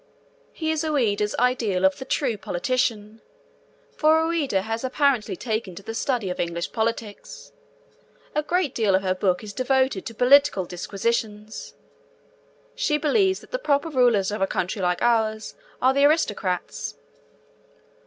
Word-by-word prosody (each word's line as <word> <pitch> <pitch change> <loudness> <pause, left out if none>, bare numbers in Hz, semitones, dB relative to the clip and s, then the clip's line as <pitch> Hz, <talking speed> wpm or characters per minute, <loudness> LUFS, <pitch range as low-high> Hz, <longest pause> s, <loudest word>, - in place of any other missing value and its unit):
He 315 -1 -2
is 315 0 -1
Ouida's 215 -9 0
ideal 230 -7 +1
of 190 0 +2
the 265 - -6
true 260 -3 0
politician, 215 +2 -2 0.7
for 315 +1 +4
Ouida 290 - 0
has 225 +2 -3
apparently 260 -5 +1
taken 215 -3 -3
to 200 - -10
the 225 - -6
study 230 -4 -1
of - - -6
English 170 0 -2
politics. 225 -2 -4 0.8
A 300 - +1
great 325 -2 0
deal 210 -4 +2
of 190 - +1
her 185 -1 +1
book 185 +1 0
is 205 -1 -8
devoted 260 -4 0
to 230 - -8
political 260 -5 +4
disquisitions. 210 +4 -3 1.0
She 340 -12 0
believes 380 +6 +2
that - - -17
the - - -2
proper 295 - +1
rulers 240 -8 +3
of 210 - -4
a 195 - +3
country 185 +2 -2
like 180 -1 0
ours 220 -2 +1 0.3
are 260 +1 +5
the 280 +1 +4
aristocrats. 205 - 0
230 Hz, 145 wpm, -24 LUFS, 200-280 Hz, 1.0 s, are